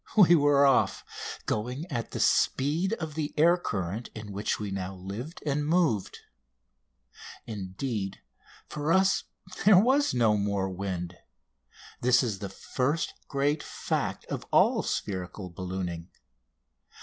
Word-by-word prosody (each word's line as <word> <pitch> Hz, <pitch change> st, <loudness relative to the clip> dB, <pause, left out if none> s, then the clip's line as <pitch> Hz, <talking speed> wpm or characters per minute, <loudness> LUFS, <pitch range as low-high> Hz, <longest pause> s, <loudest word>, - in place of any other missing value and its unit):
We 180 Hz, -5 st, +8 dB
were 145 Hz, -2 st, +5 dB
off, 135 Hz, -2 st, +3 dB, 0.4 s
going 125 Hz, +8 st, -2 dB
at 115 Hz, -, -3 dB
the -, -, -5 dB
speed 155 Hz, +9 st, +2 dB
of 160 Hz, -8 st, -4 dB
the 150 Hz, -1 st, -3 dB
air 170 Hz, +3 st, +6 dB
current 105 Hz, -, -3 dB
in 105 Hz, -1 st, -7 dB
which 100 Hz, +2 st, -2 dB
we 105 Hz, -2 st, -4 dB
now 95 Hz, 0 st, -4 dB
lived 100 Hz, -, -7 dB
and 145 Hz, 0 st, 0 dB
moved. 155 Hz, -, +1 dB, 1.2 s
Indeed, 100 Hz, 0 st, -4 dB, 0.5 s
for 150 Hz, +1 st, -2 dB
us, 190 Hz, +2 st, +3 dB, 0.4 s
there 205 Hz, -2 st, +7 dB
was 265 Hz, -, +3 dB
no 115 Hz, -3 st, +4 dB
more 100 Hz, -1 st, 0 dB
wind; 90 Hz, -2 st, -4 dB
and 90 Hz, -, -20 dB, 0.8 s
this 125 Hz, +2 st, +4 dB
is 105 Hz, -6 st, -2 dB
the 100 Hz, -, -5 dB
first 130 Hz, -, -2 dB
great 145 Hz, +2 st, 0 dB
fact -, -, -3 dB
of -, -, -4 dB
all -, -, +4 dB
spherical 95 Hz, -1 st, -4 dB
ballooning. 90 Hz, -2 st, -5 dB
120 Hz, 130 wpm, -28 LUFS, 95-150 Hz, 1.2 s, We